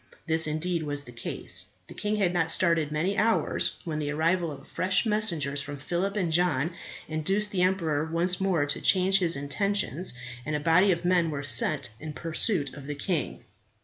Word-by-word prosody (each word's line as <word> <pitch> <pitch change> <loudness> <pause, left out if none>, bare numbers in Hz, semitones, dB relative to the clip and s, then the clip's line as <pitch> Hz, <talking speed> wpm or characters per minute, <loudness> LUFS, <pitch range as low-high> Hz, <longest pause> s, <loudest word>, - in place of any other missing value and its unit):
This 160 -1 +2
indeed 165 +3 -1
was 145 -2 -2
the 120 - -11
case. 115 -1 -1 0.2
The - - -10
king 210 +1 -2
had 190 -4 +1
not 165 -2 0
started 165 -4 +2
many 170 +6 0
hours, 225 +1 +1
when 155 -3 -3
the 145 -1 -2
arrival 165 +3 +1
of 140 -1 -11
fresh 185 +4 +1
messengers 170 - 0
from 145 0 -6
Phillip 180 +8 -2
and 180 -5 0
John 165 -2 +1 0.3
induced 195 +7 0
the 185 - 0
emperor 170 -5 +1
once 175 +2 0
more 180 -6 +2
to 145 - -2
change 190 +1 +4
his 170 -3 +2
intentions, 170 - -1 0.3
and 155 +2 -3
a - - 0
body 170 +6 +4
of 175 0 -1
men 175 -2 +3
were 145 -2 -4
sent 145 -2 +2
in 155 0 -7
pursuit 165 - -1
of 140 -2 -10
the 145 - -3
king. 150 -1 -2
165 Hz, 185 wpm, -27 LUFS, 150-185 Hz, 0.3 s, change